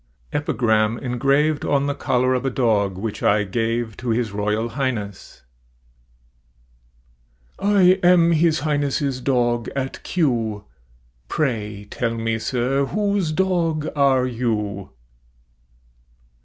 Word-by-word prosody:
EPIGRAM, 115 -6 +1
ENGRAVED 140 +5 +1
ON 140 -1 +1
THE 145 - 0
COLLAR 130 -2 +1
OF 125 0 -1
A - - +2
DOG 105 -7 +1
WHICH 105 +2 -5
I 105 +1 +3
GAVE 115 +2 -2
TO 120 - -5
HIS 115 -1 0
ROYAL 105 +3 -1
HIGHNESS. 110 -6 -4 2.2
I 205 0 +3 0.2
am 175 -1 +5
His 160 -1 +2
Highness' 145 -2 -1
dog 120 -3 0
at 135 -1 -4
Kew; 115 - -1 0.6
Pray 105 - -2
tell 115 -2 -2
me, 115 0 -1
sir, 130 +4 0
whose 200 -4 0
dog 165 -3 0
are 135 -3 +3
you? 105 -5 -2
125 Hz, 110 wpm, -22 LUFS, 110-145 Hz, 2.2 s, am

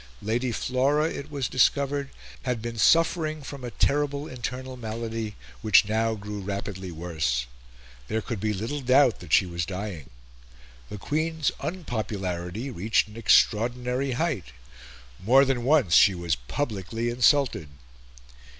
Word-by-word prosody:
Lady 120 +4 0
Flora, 135 +6 +1
it 140 -2 -6
was 140 -4 -2
discovered, 140 +2 +1 0.3
had 125 -2 -2
been 115 +1 -5
suffering 160 +1 +3
from 135 -1 -8
a 120 - -4
terrible 145 +3 0
internal 130 +1 -5
malady, 115 -2 -5 0.3
which 105 -1 +5
now 110 +1 +1
grew 105 0 -6
rapidly 100 -1 -5
worse. 80 -8 -2 0.6
There 110 +1 -2
could 115 -5 -4
be 105 +2 0
little 115 +9 -3
doubt 130 -1 +4
that 90 -4 -11
she 95 - +5
was 85 -1 -3
dying. 95 -4 -6 0.8
The - - -6
Queen's 155 - -1
unpopularity 110 - -4
reached 110 +1 +1
an 105 - -13
extraordinary 125 +4 +2
height. 145 - -1 0.8
More 130 +7 +6
than 130 -3 -1
once 135 - +3
she 95 +2 +7
was 85 -2 -1
publicly 115 - -3
insulted. 125 - +2
115 Hz, 130 wpm, -26 LUFS, 100-140 Hz, 0.8 s, she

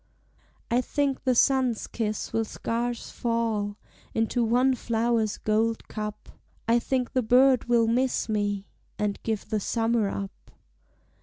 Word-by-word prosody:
I 245 +1 +3
think 280 0 -1
the 255 -1 +3
sun's 255 -2 +3
kiss 215 -2 -3
will 225 - +2
scarce 235 +2 -3
fall 225 -3 -1 0.4
Into 225 +2 +1
one 250 +4 +3
flower's 230 -2 0
gold 220 +1 0
cup; 210 -1 -6 0.4
I 235 +1 +4
think 255 0 -1
the 255 - +2
bird 255 +2 +4
will 235 -1 +3
miss 245 +2 +1
me, 205 -2 -1 0.3
And 210 -1 -2
give 220 -2 -3
the 215 - +1
summer 225 0 +1
up. 195 0 -7
230 Hz, 135 wpm, -27 LUFS, 215-245 Hz, 0.4 s, I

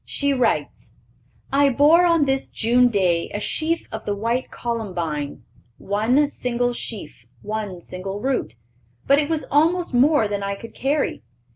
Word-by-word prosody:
She 280 -1 -1
writes: 250 -3 -1 0.6
"I 280 0 +5
bore 300 +7 +5
on 335 -4 +3
this 270 0 -1
June 245 +2 +3
day 185 -7 +1
a - - -1
sheaf 320 +9 -1
of 220 - -6
the 205 - -2
white 230 +5 -1
columbine, 175 - -4 0.3
one 225 +9 +1
single 245 -3 -1
sheaf, 185 - -8 0.2
one 210 -4 -4
single 195 +3 -6
root; 255 - -2 0.5
but 275 +1 +5
it 295 0 -1
was 320 -2 -1
almost 330 +3 +2
more 260 -2 +4
than 205 -1 -3
I 200 0 -2
could 230 +3 -11
carry. 280 +4 -1
240 Hz, 150 wpm, -22 LUFS, 200-285 Hz, 0.6 s, I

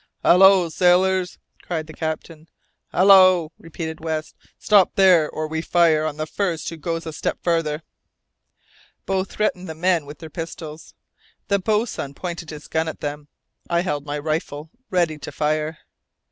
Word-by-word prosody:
"Hallo, 190 0 +6
sailors!" 180 +2 +2 0.2
cried 160 -3 -4
the 160 - -11
captain. 160 0 -5 0.4
"Hallo!" 185 -3 +6
repeated 160 -1 -7
West, 155 -1 -4 0.2
"stop 205 -4 +3
there, 180 -5 +5
or 155 0 -4
we 160 0 -3
fire 165 -2 +3
on 155 -1 -3
the 155 - -2
first 170 -1 -2
who 165 - -8
goes 165 +2 -4
a 160 - -6
step - - -2
farther!" 165 -3 0 1.2
Both 190 0 -1
threatened 185 -4 -2
the 160 - -6
men 170 -2 +1
with 145 - -9
their 160 -2 -11
pistols. 160 -1 -8 0.5
The 200 -1 +2
boatswain 210 - -1
pointed 170 -1 -6
his 150 -1 -9
gun 160 0 -1
at 160 - -6
them. 145 0 -5 0.4
I 170 0 +2
held 150 -6 -2
my 145 +1 -3
rifle, 155 0 -4 0.2
ready 170 -4 0
to - - -7
fire. 155 +1 -1
165 Hz, 155 wpm, -22 LUFS, 155-180 Hz, 1.2 s, Hallo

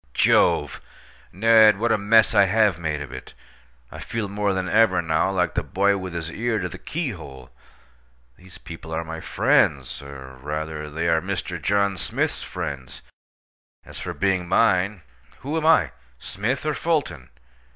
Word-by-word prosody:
Jove! 75 -2 +2 0.5
Ned, 110 +1 +5
what 115 +3 0
a 110 - +3
mess 110 +2 +4
I 100 - +6
have 105 -2 +2
made 75 -3 -3
of 70 - -8
it! - - -10 0.6
I - - -9
feel 115 -3 -4
more 100 0 -1
than 95 -1 -2
ever 100 -3 +3
now 80 +1 +1
like 90 -2 0
the - - 0
boy 100 +1 +1
with 95 -2 -6
his 85 -1 -4
ear 115 +4 -1
to 90 -3 -2
the 90 +1 -10
keyhole. 80 - -6 0.8
These 95 -1 -16
people 80 +1 -10
are 80 - -2
my 80 0 -7
friends—or, 65 -4 -1
rather, 75 +1 -5
they 80 +3 -3
are 80 -1 +2
Mr. 90 -3 -4
John 100 -1 +1
Smith's - - -2
friends. 65 -2 -6 0.8
As - - -10
for - - -5
being 95 -3 0
mine—who 90 - -1
am 160 -1 0
I, 125 - +4 0.3
Smith, 115 - -3
or 155 - 0
Fulton? 135 - -2
90 Hz, 155 wpm, -23 LUFS, 80-105 Hz, 0.8 s, I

